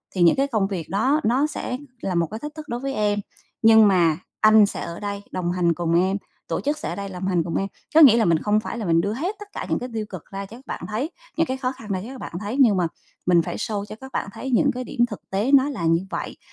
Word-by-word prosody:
thì 185 - 0
những 170 - +6
cái 275 +1 +1
công 215 -7 +1
việc 180 -6 -5
đó 260 +10 +2
nó 260 +6 +2
sẽ 255 -4 -4 0.2
là 185 - -2
một 170 -1 +2
cái 220 - -5
thách 295 +3 -7
thức 310 -1 -8
đối 240 - -2
với 275 +1 -3
em, 205 -2 +1 0.4
nhưng 220 -1 +7
mà 170 -5 +3 0.2
anh 215 -1 +7
sẽ 200 - -5
ở 170 0 -6
đây 200 -1 -4
đồng 175 -1 -1
hành 175 -2 +2
cùng 170 0 0
em, 190 +2 +1 0.3
tổ - - -2
chức 290 +2 -1
sẽ - - -4
ở - - -3
đây 200 0 -5
lồng 185 0 -4
hành 175 -3 +2
cùng 165 - -4
em, 195 - 0 0.3
có 320 - +9
nghĩa 250 -7 +9
là 225 - +3
mình 170 -3 +4
không 210 0 +3
phải 230 - -5
là 225 - -4
mình 165 -1 +3
đưa 200 +4 -1
hết 345 - -2
tất 415 - -9
cả - - -4
những - - +1
cái 250 - -5
tiêu 215 -1 -2
cực 185 -5 -8
ra 195 0 -5
cho 220 +4 -11
các 265 - -18
bạn - - -5
thấy, 235 +9 -2 0.3
những 330 - +2
cái 260 - -2
khó 255 -1 -1
khăn 255 -5 -11
ra 185 - 0
cho - - -8
các 265 - -8
bạn - - -7
thấy 210 +5 -4
nhưng 225 -8 +5
mà 175 -2 +2 0.4
mình 175 -1 +5
phải - - -5
show 210 -3 -3
cho 215 - -9
các 265 0 -9
bạn - - -2
thấy 265 - -5
những 280 +3 +4
cái 255 +1 -4
điểm 240 - -10
thực 210 - -7
tế 205 +7 0
nó 280 0 +5
là 225 -12 -3
như 165 +1 +3
vậy, - - -5
210 Hz, 300 wpm, -23 LUFS, 185-260 Hz, 0.4 s, có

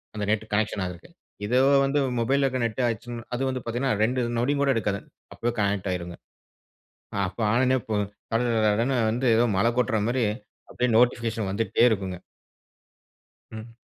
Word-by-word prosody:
அந்த 105 - -3
net 110 0 0
connection 105 -2 0
ஆகுறதுக்கு. 90 - -8 0.4
இதோ 125 +4 +2 0.3
வந்து 145 +2 +1 0.2
மொபைல்இல 135 +4 +2
இருக்கிற 130 -1 -1
நெட் 115 +3 -2
ஆச்சுனா, 115 +1 -4
அது 130 +2 -1
வந்து 130 -1 -3
பார்த்தீங்கன்னா 120 +2 -1
ரெண்டு 125 +3 +1 0.2
நொடியு 140 +5 +1
கூட 140 - +2
எடுக்காதுங்க. 100 -3 -2 0.2
அப்பவே 120 +1 -2
கனெக்ட் 100 -1 0
ஆகிடும்ங்க. 85 -1 -5 1.1
அப்ப 90 - -11
ஆன 120 - +3
உடனே 130 +1 +3
போ 110 - 0 0.4
கடகடனு 115 +1 +2
வந்து 125 +4 -2
ஏதோ 120 - +4
மழ 100 - +2
கொட்ற 110 -3 +1
மாதிரி 125 0 +1 0.5
அப்படியே 125 -1 0
நோட்டிபிகேஷன் 115 -4 +1
வந்துகிட்டே 115 +3 +2
இருக்குங்க. 95 -4 -2 1.3
ம். 115 +1 -10
115 Hz, 150 wpm, -25 LUFS, 105-125 Hz, 1.3 s, ஏதோ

